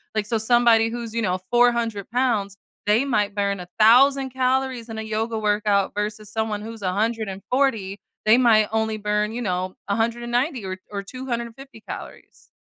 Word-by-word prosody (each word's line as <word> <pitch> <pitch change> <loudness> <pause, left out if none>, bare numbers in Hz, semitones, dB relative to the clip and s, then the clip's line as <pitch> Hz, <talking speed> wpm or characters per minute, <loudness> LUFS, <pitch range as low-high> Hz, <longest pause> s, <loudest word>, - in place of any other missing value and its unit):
like, 215 -1 0
so 225 +1 0
somebody 225 0 +4
who's, 235 -1 -6
you 230 - 0
know, 185 -1 0
400 235 -4 +2
pounds, 220 -6 0 0.3
they 215 +6 +3
might 210 -6 0
burn 200 -1 0
1,000 250 +9 +4
calories 260 -2 0
in 225 - -6
a - - -3
yoga 220 +1 -2
workout 205 -2 +1
versus 210 0 -4
someone 220 -2 -2
who's 225 0 -8
140. 210 +2 -1 0.3
They 220 +3 +6
might 220 -4 +4
only 220 0 0
burn, 210 0 -1
you 245 - -4
know, 185 -3 -2
190 240 +4 -1
or 185 0 -4
or 200 -1 -3
250 235 +1 -6
calories, - - -10
220 Hz, 150 wpm, -23 LUFS, 210-240 Hz, 0.3 s, They